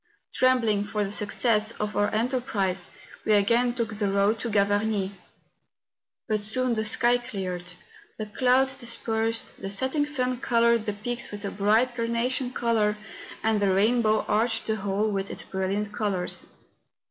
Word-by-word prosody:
Trembling 230 -6 +2
for 210 0 -2
the 195 - -4
success 215 +1 +1
of 210 0 -4
our 205 0 +2
enterprise 215 -6 -1 0.3
we 215 - +2
again 235 +4 +3
took 230 -3 -2
the 205 -1 -1
road 200 +3 +2
to 235 - -3
Gavarnie. 205 -1 +1 1.2
But 215 -1 +1
soon 240 +4 +1
the 220 -1 -1
sky 245 +2 +4
cleared, 180 -6 -5 0.4
the 215 - -4
clouds 255 +4 +2
dispersed, 230 -2 -2
the 195 - -4
setting 260 +9 0
sun 255 -4 -1
coloured 235 -2 +2
the 210 - 0
peaks 235 +4 -4
with 205 0 -6
a 200 - -3
bright 220 +5 +2
carna¬ 235 +1 -1
tion 260 -1 0
colour, 220 -4 +1 0.5
and 220 -1 +2
the 200 -1 +3
rainbow 215 +1 +2
arched 225 +2 +1
the 220 0 -1
whole 200 +2 -1
with 195 -1 -2
its - - -5
brilliant 195 +2 -2
colours. 200 -5 0
220 Hz, 155 wpm, -26 LUFS, 205-240 Hz, 1.2 s, sky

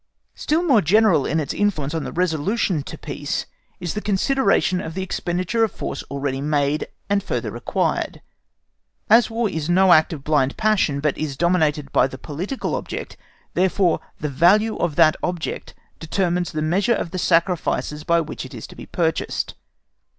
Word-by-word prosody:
Still 320 +3 0
more 270 -11 +4
general 195 -4 +4
in 160 - 0
its 150 - -2
influence 160 -9 0
on 160 -2 -2
the - - -5
resolution 180 +1 0
to - - -8
peace - - -4 0.3
is 175 - -3
the 210 - -3
consideration 200 -3 +2
of 160 0 -6
the 190 - -2
expenditure 185 +5 -1
of 220 - +1
force - - -5
already 135 -1 -2
made, 145 0 0 0.2
and 200 0 +1
further - - -3
required. - - -2 0.9
As 230 0 +6
War 225 0 0
is 160 -4 -3
no 185 +1 +6
act 155 -1 +4
of 150 -4 -6
blind 145 -3 +1
passion, 210 -10 +2
but 150 -2 +1
is 145 -3 -3
dominated 155 -5 +1
by - - +4
the 130 - -9
political 175 - -4
object, - - -5 0.4
therefore 185 -1 +2 0.2
the 150 - -2
value 195 +10 +4
of 165 -4 -1
that 155 -1 +5
object 175 -2 -4 0.2
determines 175 +1 -1
the 155 -1 -2
measure 195 +9 +2
of 165 - -4
the 185 - -3
sacrifices 165 -3 +1
by 170 +1 +3
which 155 - -6
it 130 0 -10
is 115 - -7
to - - -13
be - - -10
purchased. 165 -2 -1
170 Hz, 170 wpm, -22 LUFS, 150-195 Hz, 0.9 s, As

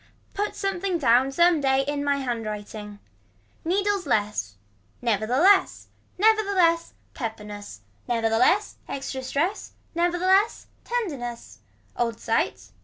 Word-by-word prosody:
Put 410 +1 -2
something 390 -2 -1
down 255 -2 +3
some 340 +1 +4
day 270 0 +2
in 290 0 -1
my 285 0 +2
hand 245 -4 -2
writing. 210 0 -7 0.7
Needles 390 +1 0
less. 205 - 0 0.4
Never 215 -3 0
the 250 +3 +1
less. 385 +5 +4 0.3
Never 435 +3 +5
the 405 -1 -3
less. 335 -2 +3 0.2
Pepperness. 210 - -7 0.3
Never 230 -2 +1
the 225 0 +1
less 390 - +2
extra 270 -1 -4
stress. 320 +10 -2 0.2
Never 345 +1 +1
the 360 - -2
less. 390 +4 +3 0.2
Tenderness. 285 - -4 0.4
Old 230 -2 -1
sight. 105 - -1
275 Hz, 135 wpm, -25 LUFS, 225-370 Hz, 0.7 s, Never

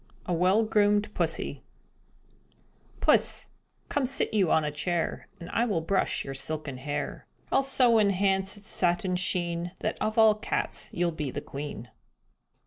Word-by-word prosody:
A 180 - -1
WELL 185 +6 +3
GROOMED 210 -1 +2
PUSSY - - -2 1.4
Puss, - - +3 0.4
come 280 -3 0
sit 270 - -1
you 195 -6 +3
on 155 - +3
a 150 - -2
chair 170 +3 -2
And 170 - -8
I 230 - +1
will 205 -8 0
brush 190 +4 0
your 135 - -5
silken 145 0 -4
hair; 145 +3 -4 0.2
I'll - - +4
so 255 -4 +4
enhance 195 -1 +2
its 205 +1 -5
satin 180 +1 +2
sheen 175 -1 -1
That - - -2
of 215 +1 -1
all 220 -1 +7
cats 210 - -2
you'll 175 -1 0
be 150 -3 -4
the 135 - -4
queen. 145 -5 -7
185 Hz, 150 wpm, -28 LUFS, 160-210 Hz, 1.4 s, all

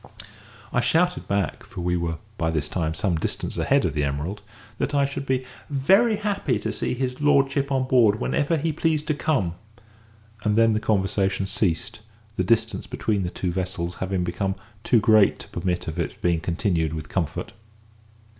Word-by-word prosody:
I - - +3
shouted 180 +2 +1
back 100 -1 -1
(for - - -8
we 90 0 0
were 85 -1 -2 0.2
by 80 -5 0
this 75 -2 -1
time 80 -1 -2
some 90 -4 0
distance - - -2
ahead - - +3
of - - 0
the 75 - 0
Emerald) 75 +9 -3 0.4
that 145 - -1
I 140 -1 +4
should 140 0 -5
be 130 -1 0 0.4
happy 205 - +3
to - - -3
see - - -1
his 125 +1 -3
lordship 140 -1 +3
on 135 -1 +2
board 115 -5 +4
whenever 155 +3 +1
he 155 +1 -1
pleased 155 0 0
to - - +4
come; 135 - 0 0.9
and 105 -1 +2
then 115 0 +5
the 105 - +1
conversation 95 -2 +1
ceased, 95 -1 -1 0.4
the 95 - +1
distance 115 +5 +1
between 105 -3 -1
the 90 - -1
two 90 0 -3
vessels 90 -1 -3
having 95 -1 -1
become 95 +2 -1 0.3
too 120 - +4
great 110 -2 +5
to - - -9
permit 90 -1 -2
of 80 - -4
its - - -2
being 85 -2 +1
continued 85 -2 0
with 75 -2 -6
comfort. 85 -6 -3
100 Hz, 175 wpm, -24 LUFS, 90-135 Hz, 0.9 s, then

